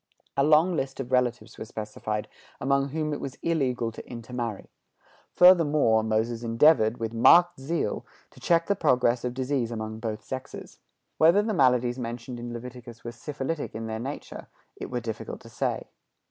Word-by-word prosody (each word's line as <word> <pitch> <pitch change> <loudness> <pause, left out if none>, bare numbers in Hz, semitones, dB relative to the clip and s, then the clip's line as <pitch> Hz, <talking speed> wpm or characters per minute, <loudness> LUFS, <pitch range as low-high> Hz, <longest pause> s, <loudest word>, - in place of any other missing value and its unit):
A 140 - +3
long 155 +4 +4
list 135 -3 -3
of 130 -1 -5
relatives 125 -2 0
were - - -5
specified 105 -1 -4 0.3
among 140 +1 +1
whom 155 +1 -2
it - - -4
was 135 -1 -6
illegal 130 -8 0
to 115 - -11
intermarry. 120 -3 -5 0.6
Furthermore, 155 -11 +5
Moses 110 +1 -1
endeavored, 115 0 +4
with 115 0 -4
marked 175 +8 +6
zeal, 145 -4 -2 0.3
to - - -17
check 170 -1 +2
the 200 - +1
progress 125 -6 +2
of 125 0 -3
disease 130 -2 -1
among 110 -1 -5
both 110 -1 -4
sexes. 130 0 -8 0.4
Whether 170 +6 +6
the 220 0 -1
maladies 125 - +2
mentioned 120 +1 -5
in 120 0 -6
Leviticus 120 0 -9
were 120 - -5
syphilitic 140 +5 -5
in 115 0 -4
their 110 0 -4
nature, 135 +5 -7 0.3
it - - -7
were 125 -1 -3
difficult 115 -2 -6
to - - -13
say. - - -2
125 Hz, 165 wpm, -27 LUFS, 115-145 Hz, 0.6 s, marked